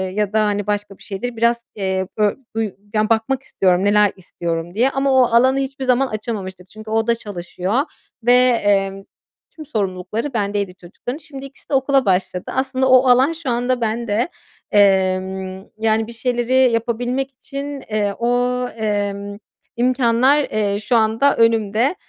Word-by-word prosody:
ya 210 Hz, -1 st, -1 dB
da, 215 Hz, -1 st, +3 dB
hani, 205 Hz, -1 st, -1 dB
başka 205 Hz, -1 st, -2 dB
bir -, -, -16 dB
şeydir, 230 Hz, +4 st, -5 dB
biraz 235 Hz, +1 st, +1 dB
e 190 Hz, -1 st, -1 dB
bö 210 Hz, -1 st, +2 dB, 0.2 s
buy 220 Hz, -2 st, -1 dB, 0.2 s
ya, 215 Hz, 0 st, +1 dB
bakmak 245 Hz, +4 st, +1 dB
istiyorum, 185 Hz, -1 st, +1 dB
“Neler 205 Hz, -1 st, +4 dB
istiyorum?” 170 Hz, -2 st, -5 dB
diye 245 Hz, +5 st, +3 dB
ama 275 Hz, 0 st, 0 dB
o 260 Hz, -1 st, +5 dB
alanı 260 Hz, +3 st, +4 dB
hiçbir 270 Hz, 0 st, -4 dB
zaman 255 Hz, +1 st, +3 dB
açamamıştık. 195 Hz, -5 st, -6 dB
Çünkü 215 Hz, +2 st, -11 dB
o 225 Hz, +1 st, +1 dB
da 235 Hz, -, +3 dB
çalışıyor 200 Hz, +2 st, -3 dB, 0.4 s
ve, 245 Hz, -, +5 dB
emm, 205 Hz, -6 st, +2 dB, 0.5 s
tüm 310 Hz, -, -9 dB
sorumlulukları 215 Hz, +2 st, -3 dB
bendeydi 200 Hz, -3 st, -1 dB
çocukların. 190 Hz, -, -7 dB
Şimdi 285 Hz, -4 st, -10 dB
ikisi 275 Hz, 0 st, -15 dB
de -, -, -4 dB
okula 270 Hz, -1 st, +3 dB
başladı. 185 Hz, -1 st, 0 dB
Aslında 265 Hz, 0 st, 0 dB
o 255 Hz, 0 st, +6 dB
alan 260 Hz, +6 st, +5 dB
şu 320 Hz, -5 st, -6 dB
anda 245 Hz, +1 st, 0 dB
bende. 225 Hz, +4 st, -1 dB, 0.4 s
Emm, 190 Hz, -1 st, +2 dB
yani, 220 Hz, 0 st, +1 dB
bir 235 Hz, -, -8 dB
şeyleri 250 Hz, +1 st, +2 dB
yapabilmek 245 Hz, +4 st, -1 dB
için, 275 Hz, +1 st, -7 dB
eee, 210 Hz, -2 st, 0 dB
o, 245 Hz, +1 st, +1 dB
emm, 205 Hz, -2 st, -3 dB, 0.4 s
imkânlar, 255 Hz, +2 st, +3 dB
eee, 205 Hz, -4 st, -1 dB
şu 225 Hz, +3 st, 0 dB
anda 225 Hz, +5 st, +3 dB
önümde. 230 Hz, -, +2 dB
225 Hz, 155 wpm, -20 LUFS, 200-255 Hz, 0.5 s, o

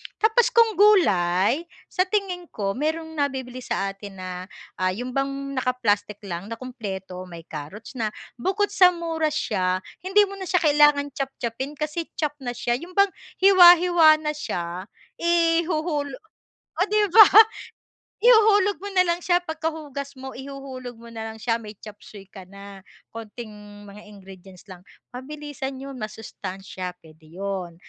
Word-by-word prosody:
Tapos 450 Hz, +3 st, +3 dB
kung 455 Hz, -4 st, +4 dB
gulay, 235 Hz, -, +3 dB, 0.2 s
sa 370 Hz, +1 st, +1 dB
tingin 370 Hz, -4 st, -2 dB
ko, 195 Hz, -2 st, -3 dB
mayroong 320 Hz, +6 st, -3 dB
nabibili 260 Hz, -3 st, -2 dB
sa 195 Hz, -5 st, -2 dB
atin 195 Hz, 0 st, -11 dB
na, 185 Hz, -1 st, -7 dB, 0.5 s
ah, 185 Hz, 0 st, +1 dB
'yon 250 Hz, +3 st, -5 dB
bang 275 Hz, +2 st, 0 dB, 0.3 s
naka-plastic 215 Hz, -5 st, -1 dB
lang, 180 Hz, +1 st, -6 dB
na 230 Hz, -, -5 dB
kompleto, 195 Hz, -7 st, -7 dB
may 170 Hz, -2 st, -10 dB
carrots 155 Hz, +8 st, -9 dB
na. 220 Hz, -, 0 dB, 0.3 s
Bukod 395 Hz, -, 0 dB
sa 360 Hz, -1 st, +5 dB
mura 325 Hz, -2 st, -1 dB
siya, 185 Hz, -10 st, -1 dB, 0.2 s
hindi 385 Hz, +3 st, +3 dB
mo 395 Hz, 0 st, -6 dB
na 380 Hz, -, -6 dB
siya 360 Hz, -1 st, +1 dB
kailangan 295 Hz, -1 st, +4 dB
chop-chop-pin, 270 Hz, 0 st, -5 dB
kasi 305 Hz, +3 st, -3 dB
chopped 295 Hz, -2 st, -3 dB
na 245 Hz, -3 st, -5 dB
siya, 240 Hz, +1 st, -1 dB
'yon 355 Hz, +2 st, -11 dB
bang 395 Hz, 0 st, +4 dB, 0.3 s
hiwa-hiwa 350 Hz, -4 st, +7 dB
na 300 Hz, -, 0 dB
siya. 180 Hz, -, -5 dB, 0.3 s
Ihuhulo 330 Hz, -4 st, +1 dB, 0.6 s
oh, 370 Hz, -, +4 dB
'di 425 Hz, 0 st, +3 dB
ba? 430 Hz, -3 st, +10 dB, 1.0 s
Ihuhulog 415 Hz, -6 st, +5 dB
mo 405 Hz, -, -5 dB
na 365 Hz, -, +6 dB
lang 340 Hz, +1 st, 0 dB
siya 350 Hz, 0 st, +3 dB
pagkahugas 310 Hz, -4 st, -5 dB
mo, 265 Hz, 0 st, -7 dB
ihuhulog 265 Hz, -2 st, -8 dB
mo 235 Hz, 0 st, -12 dB
nalang 220 Hz, 0 st, -6 dB
siya, 230 Hz, +1 st, 0 dB
may 215 Hz, -1 st, -10 dB
chopsuey 205 Hz, -1 st, -12 dB
ka 195 Hz, -1 st, -12 dB
na. 200 Hz, 0 st, -12 dB, 0.3 s
Konting 225 Hz, 0 st, -8 dB, 0.4 s
mga 205 Hz, +1 st, -12 dB
ingredients 190 Hz, -1 st, -14 dB
lang, 180 Hz, -1 st, -11 dB, 0.3 s
mabilisan 290 Hz, 0 st, -6 dB
'yon, 275 Hz, 0 st, -8 dB
masustansiya, 190 Hz, -4 st, -7 dB
puwede 160 Hz, 0 st, -18 dB
'yon. 185 Hz, -1 st, -5 dB
265 Hz, 145 wpm, -24 LUFS, 200-335 Hz, 1.0 s, ba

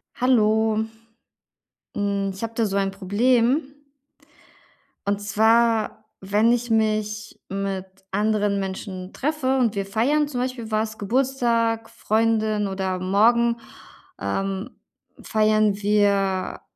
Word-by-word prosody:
Hallo. 220 Hz, -3 st, +2 dB, 1.1 s
Hm, 200 Hz, -1 st, -1 dB
ich 190 Hz, -, -10 dB
habe 230 Hz, 0 st, -4 dB
da 225 Hz, -1 st, +1 dB
so 195 Hz, -, -2 dB
ein 195 Hz, -1 st, 0 dB
Problem 240 Hz, -, +1 dB, 1.3 s
und 200 Hz, 0 st, 0 dB
zwar, 220 Hz, +1 st, +2 dB
wenn 205 Hz, +4 st, +2 dB
ich 240 Hz, 0 st, 0 dB
mich 215 Hz, -1 st, -1 dB
mit 195 Hz, -1 st, -3 dB, 0.3 s
anderen 205 Hz, 0 st, +1 dB
Menschen 190 Hz, -1 st, -6 dB
treffe 270 Hz, -2 st, 0 dB
und 235 Hz, -4 st, +1 dB
wir 200 Hz, -1 st, -1 dB
feiern 265 Hz, +9 st, +1 dB
zum 255 Hz, -4 st, -3 dB
Beispiel 250 Hz, -3 st, -4 dB
was, 215 Hz, 0 st, -1 dB
Geburtstag, 230 Hz, -1 st, 0 dB
Freundin 220 Hz, -2 st, 0 dB
oder 190 Hz, -1 st, -2 dB
morgen, 230 Hz, +5 st, +3 dB, 0.6 s
ähm, 195 Hz, -, -2 dB, 0.5 s
feiern 215 Hz, -1 st, +2 dB
wir 200 Hz, -2 st, +1 dB
215 Hz, 105 wpm, -23 LUFS, 200-230 Hz, 1.3 s, morgen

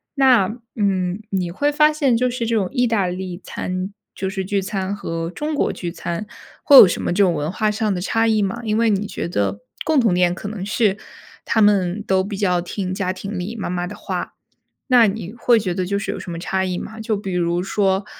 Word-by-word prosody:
那， 255 Hz, -8 st, +4 dB, 0.2 s
嗯， 190 Hz, -2 st, 0 dB
你 185 Hz, -3 st, -1 dB
会 290 Hz, +11 st, +1 dB
发 300 Hz, +1 st, +4 dB
现 275 Hz, -6 st, +2 dB
就 250 Hz, +2 st, +2 dB
是 240 Hz, -2 st, -3 dB
这 230 Hz, -, +1 dB
种 200 Hz, -4 st, +1 dB
意 245 Hz, -2 st, +2 dB
大 220 Hz, -4 st, +1 dB
利 180 Hz, 0 st, -4 dB
餐 185 Hz, +2 st, -4 dB, 0.2 s
就 190 Hz, -, -3 dB
是 190 Hz, 0 st, -3 dB
聚 200 Hz, +1 st, 0 dB
餐 195 Hz, 0 st, -3 dB
和 165 Hz, -4 st, -4 dB
中 300 Hz, -, -4 dB
国 290 Hz, -, +1 dB
聚 175 Hz, -2 st, -5 dB
餐 170 Hz, +3 st, -4 dB, 0.4 s
会 285 Hz, -, +6 dB
有 205 Hz, -, +11 dB
什 -, -, -2 dB
么 -, -, -1 dB
这 200 Hz, +2 st, +4 dB
种 185 Hz, -, +4 dB
文 150 Hz, +2 st, -2 dB
化 210 Hz, +3 st, 0 dB
上 210 Hz, 0 st, 0 dB
的 180 Hz, -, -3 dB
差 225 Hz, +4 st, +1 dB
异 220 Hz, -2 st, +2 dB
吗？ 220 Hz, +4 st, -2 dB
因 215 Hz, -2 st, 0 dB
为 230 Hz, -1 st, +3 dB
你 205 Hz, 0 st, +1 dB
觉 200 Hz, -, -4 dB
得 100 Hz, -, -1 dB, 0.2 s
共 315 Hz, -3 st, +2 dB
同 225 Hz, -6 st, +3 dB
点 180 Hz, -1 st, +3 dB
可 195 Hz, -, -7 dB
能 200 Hz, -3 st, -5 dB
是 205 Hz, -1 st, +1 dB, 0.5 s
他 220 Hz, -, +2 dB
们 200 Hz, -1 st, +3 dB
都 190 Hz, 0 st, +2 dB
比 200 Hz, +1 st, -5 dB
较 180 Hz, -3 st, +1 dB
听 185 Hz, +2 st, -4 dB
家 185 Hz, 0 st, -1 dB
庭 195 Hz, +1 st, -6 dB
里 190 Hz, +6 st, -4 dB
妈 215 Hz, -, -4 dB
妈 175 Hz, 0 st, -2 dB
的 205 Hz, -, -7 dB
话。 205 Hz, -, -5 dB, 0.5 s
那 245 Hz, -3 st, +6 dB
你 200 Hz, 0 st, -4 dB
会 235 Hz, -1 st, +3 dB
觉 185 Hz, -4 st, -2 dB
得 185 Hz, 0 st, -1 dB
就 200 Hz, +2 st, -1 dB
是 200 Hz, -, -3 dB
有 -, -, -5 dB
什 175 Hz, -, -7 dB
么 165 Hz, -, -5 dB
差 190 Hz, +2 st, -1 dB
异 180 Hz, -1 st, -2 dB
吗？ 220 Hz, 0 st, -8 dB
就 220 Hz, -1 st, -1 dB
比 195 Hz, -2 st, -5 dB
如 175 Hz, 0 st, 0 dB
说， 195 Hz, 0 st, +1 dB
195 Hz, 255 characters per minute, -21 LUFS, 180-220 Hz, 0.5 s, 有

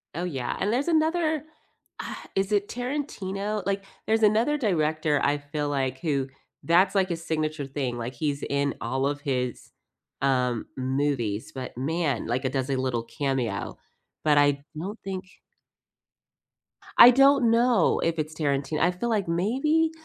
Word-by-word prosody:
Oh 175 Hz, -, -2 dB
yeah, 135 Hz, -9 st, -3 dB
and 205 Hz, -, 0 dB
there's 270 Hz, +7 st, 0 dB
another, 315 Hz, -1 st, +1 dB, 0.6 s
ugh -, -, -5 dB, 0.2 s
is 195 Hz, +1 st, 0 dB
it 205 Hz, -1 st, +2 dB
Tarantino? 215 Hz, -6 st, -3 dB
Like, 200 Hz, 0 st, -1 dB, 0.2 s
there's 220 Hz, 0 st, +1 dB
another 225 Hz, +8 st, +3 dB
director 155 Hz, -, +1 dB
I 145 Hz, +1 st, +2 dB
feel 145 Hz, 0 st, -3 dB
like 130 Hz, -2 st, -1 dB
who 140 Hz, -4 st, -1 dB, 0.4 s
that's 185 Hz, +4 st, +3 dB
like 190 Hz, -2 st, +2 dB
a -, -, 0 dB
signature 155 Hz, -2 st, -2 dB
thing, 135 Hz, -3 st, -3 dB
like 120 Hz, +2 st, -4 dB
he's 140 Hz, +2 st, -2 dB
in 140 Hz, 0 st, 0 dB
all 130 Hz, +4 st, -1 dB
of 145 Hz, 0 st, -3 dB
his, 125 Hz, -4 st, -3 dB, 0.5 s
um, 125 Hz, -3 st, +1 dB
movies, 130 Hz, -5 st, -1 dB
but 130 Hz, -2 st, -7 dB
man, 155 Hz, +2 st, -1 dB
like 125 Hz, +3 st, -1 dB
it 130 Hz, -, 0 dB
does 135 Hz, -1 st, -1 dB
a 135 Hz, -, +1 dB
little 130 Hz, -3 st, -1 dB
cameo, 120 Hz, -4 st, -2 dB, 0.5 s
but 150 Hz, -1 st, +4 dB
I 145 Hz, -1 st, +3 dB
don't 200 Hz, +7 st, -5 dB
think 190 Hz, -1 st, -4 dB, 1.8 s
I 245 Hz, -, +12 dB
don't 270 Hz, -2 st, +5 dB
know 235 Hz, +1 st, +3 dB
if 165 Hz, 0 st, 0 dB
it's 155 Hz, 0 st, -3 dB
Tarantin 145 Hz, 0 st, -1 dB
I 175 Hz, -, +3 dB
feel 180 Hz, +7 st, -3 dB
like 205 Hz, -5 st, 0 dB
maybe, 270 Hz, -, +1 dB
155 Hz, 155 wpm, -26 LUFS, 135-210 Hz, 1.8 s, I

